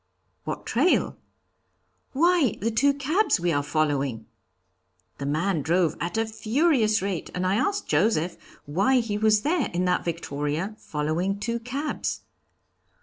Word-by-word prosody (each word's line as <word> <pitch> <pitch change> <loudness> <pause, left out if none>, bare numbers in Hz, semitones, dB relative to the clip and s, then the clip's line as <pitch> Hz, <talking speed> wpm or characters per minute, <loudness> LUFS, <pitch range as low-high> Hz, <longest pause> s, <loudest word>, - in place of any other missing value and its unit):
'What - - -5
trail?' 275 +10 +2 1.0
'Why, 330 - +3
the 230 +4 -1
two 280 +6 +3
cabs 300 - +1
we 175 0 0
are 145 - +1
following.' 140 -6 -1 0.9
The 140 - -3
man 160 +3 0
drove 165 +1 +1
at 170 +4 -2
a 225 - +2
furious 220 - +1
rate, 195 -4 -3
and 180 0 -1
I 185 - +2
asked 400 - 0
Joseph 170 +1 +1 0.3
why 195 - +2
he 215 -3 -2
was 215 -1 +4
there 305 +1 0
in 180 +1 0
that 180 0 +1
victoria, 160 +3 -3
following 160 +6 -2
two 235 +2 -2
cabs. 270 +6 -3
200 Hz, 140 wpm, -25 LUFS, 160-245 Hz, 1.0 s, was